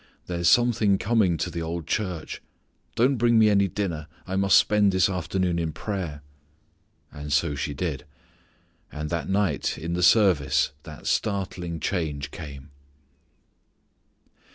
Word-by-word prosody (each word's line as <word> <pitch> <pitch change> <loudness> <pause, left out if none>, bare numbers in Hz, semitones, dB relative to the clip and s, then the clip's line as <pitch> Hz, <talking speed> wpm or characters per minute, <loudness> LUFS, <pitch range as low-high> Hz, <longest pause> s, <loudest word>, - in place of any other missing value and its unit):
There's 85 -2 +1
something 115 -5 +3
coming 100 -6 +2
to 80 - -3
the 85 - -4
old 85 0 -4
church. 90 -5 -3 0.5
Don't 130 +3 +3
bring 120 0 +3
me 110 -1 +5
any 100 -1 +3
dinner. 85 -6 -3 0.2
I 95 - -4
must 95 0 +5
spend 105 -1 +3
this 95 -1 +3
afternoon 90 0 -1
in 80 -2 -2
prayer." 85 -7 -5 0.9
And 75 0 -7
so 75 +2 +2
she 70 +1 -3
did. 75 -4 -3 0.9
And 75 +1 -5
that 85 -1 -2
night 100 0 0
in 85 +2 -4
the 90 - -1
service 85 -8 +4
that 75 -2 -11
startling 90 -5 -2
change 75 -5 -3
came. 70 -3 -9
90 Hz, 135 wpm, -25 LUFS, 75-100 Hz, 0.9 s, me